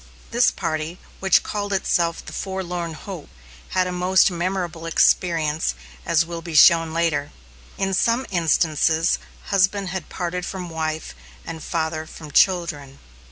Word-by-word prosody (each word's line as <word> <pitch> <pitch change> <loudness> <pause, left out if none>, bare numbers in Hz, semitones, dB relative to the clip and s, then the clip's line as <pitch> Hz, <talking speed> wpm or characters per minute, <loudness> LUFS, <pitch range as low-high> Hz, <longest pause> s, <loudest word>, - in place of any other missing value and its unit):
This 240 +2 +4
party, 155 +2 -3 0.2
which 190 -2 +4
called 205 -1 -3
itself 170 -3 0
"The - - -9
Forlorn 180 -4 -4
Hope," 180 -2 -8 0.4
had 185 0 +1
a 180 - -3
most 185 +1 +3
memorable 175 -2 -3
experience, 165 - +2 0.3
as 165 0 +3
will 170 0 -6
be 165 -1 -7
shown 165 0 +7
later. 160 -3 0 0.5
In 195 0 -1
some 230 +7 +2
instances 165 -1 +2 0.3
husband 195 0 +2
had 185 -2 -5
parted 180 0 -3
from 180 -1 -5
wife, 160 - -3 0.3
and 165 -1 -6
father 160 -1 -2
from 155 -2 -11
children. 150 -7 +2
170 Hz, 135 wpm, -22 LUFS, 160-185 Hz, 0.5 s, shown